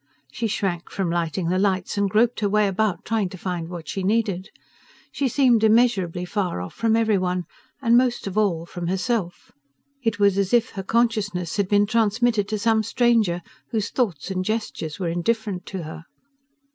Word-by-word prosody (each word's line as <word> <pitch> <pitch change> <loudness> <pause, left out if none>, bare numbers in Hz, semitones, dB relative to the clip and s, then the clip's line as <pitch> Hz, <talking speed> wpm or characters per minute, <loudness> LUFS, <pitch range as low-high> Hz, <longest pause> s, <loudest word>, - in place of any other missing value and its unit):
She 225 +11 -2
shrank 190 -5 -2
from 190 -3 -2
lighting 170 0 -1
the 185 +1 +1
lights, 190 -2 0
and 200 -1 +1
groped 225 +4 +2
her 205 - +1
way 210 0 +3
about, 200 0 -1
trying 215 -4 0
to 185 - -9
find 175 -2 -4
what 175 -2 -7
she 195 - -3
needed. 200 -2 0 0.6
She 280 - 0
seemed 245 -3 +3
immeasurably 215 -6 +3
far 185 - -2
off 90 0 -6
from 225 -1 +1
every 220 -3 +2
one, 180 0 -1 0.4
and 230 -1 +4
most 245 0 +2
of 195 -1 -5
all 190 -6 +1
from 175 0 -6
herself. 190 -1 -2 0.5
It 225 -4 0
was 200 -1 +3
as 200 +4 +2
if 235 -1 +2
her 195 - -5
consciousness 205 -5 0
had 200 -2 +1
been 205 0 +4
transmitted 225 0 +1
to 215 +1 -2
some 220 +1 +2
stranger 225 -6 +2 0.3
whose 220 -2 -2
thoughts 195 - -1
and 185 -1 -1
gestures 200 -7 -3
were 180 -3 -1
indifferent 190 +2 -2
to 190 -3 -5
her... 160 +1 -8
200 Hz, 185 wpm, -23 LUFS, 180-225 Hz, 0.6 s, and